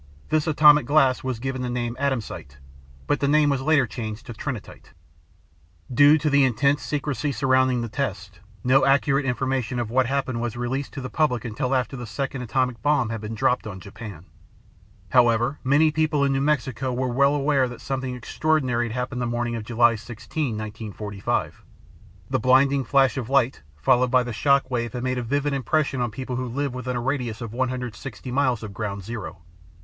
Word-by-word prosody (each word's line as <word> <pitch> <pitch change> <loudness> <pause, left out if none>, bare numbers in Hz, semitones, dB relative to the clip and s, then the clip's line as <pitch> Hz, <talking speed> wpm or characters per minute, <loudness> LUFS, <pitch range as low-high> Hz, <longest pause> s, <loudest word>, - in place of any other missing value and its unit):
This 155 +1 +1
atomic 150 -3 +6
glass 135 -3 +3
was 130 -2 -2
given 130 +2 -4
the 125 - -2
name 120 -1 -2
Atomsite, 120 - -3 0.5
but 145 - 0
the 140 - +1
name 150 0 +4
was 135 -2 0
later 145 -1 +3
changed 110 -1 -6
to 120 - -7
Trinitite. 120 -1 -7 1.0
Due 145 +4 +7
to 155 0 -2
the 140 -1 +4
intense 140 +3 +2
secrecy 145 -2 -2
surrounding 130 -2 +2
the 115 - -3
test, 100 -7 -4 0.2
no 130 +2 +4
accurate 135 0 +3
information 130 -1 -1
of 120 -2 -3
what 130 0 +2
happened 130 -3 -1
was 120 -1 -3
released 130 +3 -3
to 135 - -5
the 130 - -5
public 125 -7 0
until 125 +4 -1
after 125 0 -1
the 120 -2 -7
second 135 +3 -4
atomic 125 -1 -1
bomb 145 -4 +2
had 115 -2 -4
been 110 +1 -5
dropped 125 -1 +1
on 95 -3 -7
Japan. 100 -2 -10 0.8
However, 120 +2 +3
many 145 +4 +4
people 150 -1 +1
in 140 -1 +2
New 135 - 0
Mexico 135 -3 0
were 130 +1 -1
well 140 +3 +3
aware 140 -2 +2
that 125 - -9
something 130 -2 -3
extraordinary 125 -1 0
had 115 - -6
happened 125 0 -3
the 120 - -1
morning 120 0 -2
of 115 - -4
July 120 +1 +3
16, 115 +3 -4
1945. 105 -2 -4 0.6
The - - 0
blinding 135 +3 +4
flash 135 0 +3
of 125 -3 -4
light, 135 - +2
followed 125 - +3
by 125 0 +4
the 120 -1 -5
shock 140 +3 +2
wave 120 -2 -2
had 125 - -4
made 130 0 -1
a - - -2
vivid 140 +4 -1
impression 140 0 0
on 120 - 0
people 125 +2 -5
who 130 0 -3
lived 140 +2 -2
within 125 0 -4
a - - -1
radius 125 -4 -2
of 115 -3 -6
160 125 -1 -4
miles 130 -4 +1
of 105 -2 -7
ground 100 -1 -4
zero. 100 -5 -7
130 Hz, 190 wpm, -24 LUFS, 115-140 Hz, 1.0 s, Due